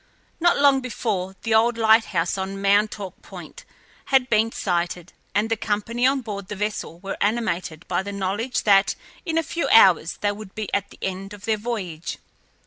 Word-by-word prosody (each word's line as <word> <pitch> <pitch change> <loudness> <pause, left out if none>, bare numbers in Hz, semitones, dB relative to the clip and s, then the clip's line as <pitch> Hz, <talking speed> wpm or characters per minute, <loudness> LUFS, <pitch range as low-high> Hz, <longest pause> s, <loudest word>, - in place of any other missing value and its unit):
Not 345 +1 +3
long 280 -2 +5
before, 195 -6 -3
the 225 - 0
old 230 +2 +3
light 220 0 +5
house 170 -2 -1
on 195 0 -4
Montauk 200 -1 +1
Point - - -11 0.4
had 265 -2 +2
been 220 +1 +3
sighted, 175 -2 -2 0.2
and 210 +2 +2
the 225 - +1
company 225 +3 0
on 270 0 +1
board 200 -4 -6
the 210 - -5
vessel 210 -4 -3
were 195 0 -5
animated 185 -7 -1
by 180 0 0
the 200 +1 -6
knowledge 205 +6 -2
that 200 -1 +4 0.3
in 325 -1 0
a 330 - +2
few 335 +2 -2
hours 180 -6 +5
they 205 - +2
would 205 -1 -10
be 215 -2 -5
at 200 0 0
the - - -16
end 195 +2 -4
of 205 - -12
their 220 -1 +1
voyage. 195 -8 -4
205 Hz, 185 wpm, -23 LUFS, 190-230 Hz, 0.4 s, long